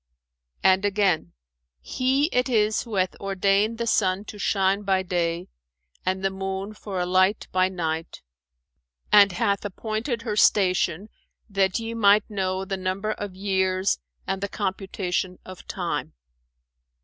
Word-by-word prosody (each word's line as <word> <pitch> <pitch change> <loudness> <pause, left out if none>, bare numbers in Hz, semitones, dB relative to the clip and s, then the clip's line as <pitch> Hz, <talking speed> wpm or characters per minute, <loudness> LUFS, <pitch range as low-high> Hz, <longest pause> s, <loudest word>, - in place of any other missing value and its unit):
'[FN#415] 60 0 -54
And 190 +2 -1
again, 195 - +1 0.5
'He 260 - +1
it 250 +1 +2
is 215 -3 +2
who 230 -3 -6
hath 185 -1 +1
ordained 195 +3 +1
the 235 - -2
sun 190 -2 +1
to 210 - -9
shine 195 0 +1
by 190 -2 +1
day, 175 -1 -1 0.6
and 190 +1 -1
the 195 - +2
moon 190 +1 -4
for 200 -3 -5
a 180 - 0
light 185 +3 +2
by 185 0 +2
night; 165 - -4 0.9
and 200 -1 +7
hath 200 +3 0
appointed 220 +4 -3
her 215 -3 -2
station 185 -2 +3 0.4
that 195 -2 +1
ye 230 0 -4
might 210 -2 +4
know 190 -1 -1
the 195 0 -3
number 190 +3 -2
of 205 -3 -5
years 190 -1 +1 0.3
and 190 0 -2
the 200 - -2
computation 190 -2 -2
of 185 -1 -11
time.' - - -3
195 Hz, 145 wpm, -25 LUFS, 185-210 Hz, 0.9 s, and